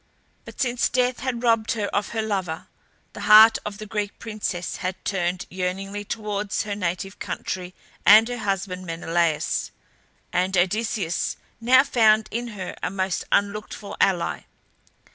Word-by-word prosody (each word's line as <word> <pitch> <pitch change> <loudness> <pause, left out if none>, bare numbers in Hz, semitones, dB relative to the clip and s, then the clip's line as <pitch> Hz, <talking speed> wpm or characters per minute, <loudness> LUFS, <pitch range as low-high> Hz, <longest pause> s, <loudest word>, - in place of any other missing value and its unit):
But - - -12
since 250 -2 +1
death 250 0 +1
had 250 -2 -3
robbed 225 -2 +2
her 215 -3 -2
of 205 - -1
her 225 -1 -2
lover, 190 -6 -3 0.5
the - - -9
heart 220 +1 +9
of 205 -1 -5
the 215 - -7
Greek 210 -1 -3
princess 210 -5 -4
had 185 -1 -3
turned 180 -2 -1
yearningly 190 +3 -3
towards 210 -1 -2
her 210 - -4
native 190 0 -3
country 180 -1 -5 0.3
and 215 +2 +8
her 245 -1 -4
husband 190 -3 -3
Menelaus, 165 -1 0 0.6
and 185 +1 +1
Odysseus 190 -1 0 0.2
now 255 +3 +6
found 220 -6 +3
in 240 +2 -3
her 185 -2 -5
a - - -1
most 190 -1 -2
unlooked 205 +1 0
for 205 - -8
ally. 180 -3 +1
205 Hz, 145 wpm, -24 LUFS, 185-220 Hz, 0.6 s, heart